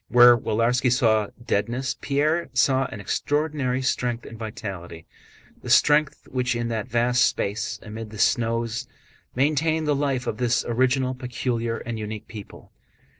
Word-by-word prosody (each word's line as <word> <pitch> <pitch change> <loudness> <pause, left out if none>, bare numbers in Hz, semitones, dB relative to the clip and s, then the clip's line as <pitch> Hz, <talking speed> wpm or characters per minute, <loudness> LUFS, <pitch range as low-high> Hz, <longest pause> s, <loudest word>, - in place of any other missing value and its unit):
Where 120 0 +8
Willarski 120 +3 +1
saw 110 -4 +3 0.2
deadness 120 +5 -1
Pierre 150 +4 0
saw 135 -1 +3
an 110 - -7
extraordinary 140 +3 -1
strength 125 -2 -1
and 115 - -9
vitality—the 95 -7 -9
strength 150 -1 +3
which 125 -1 -1
in 120 0 -2
that 115 0 -3
vast 120 0 +2
space 105 +2 -1
amid 110 0 -7
the 110 - -10
snows 115 +2 0 0.5
maintained 155 +4 +1
the 150 - +3
life 140 -3 -1
of 110 - -3
this 125 -1 +1
original, 130 +2 +1
peculiar, 125 -2 -3
and 115 -2 -5
unique 105 0 -6
people. 105 -3 -11
120 Hz, 135 wpm, -24 LUFS, 115-130 Hz, 0.5 s, Where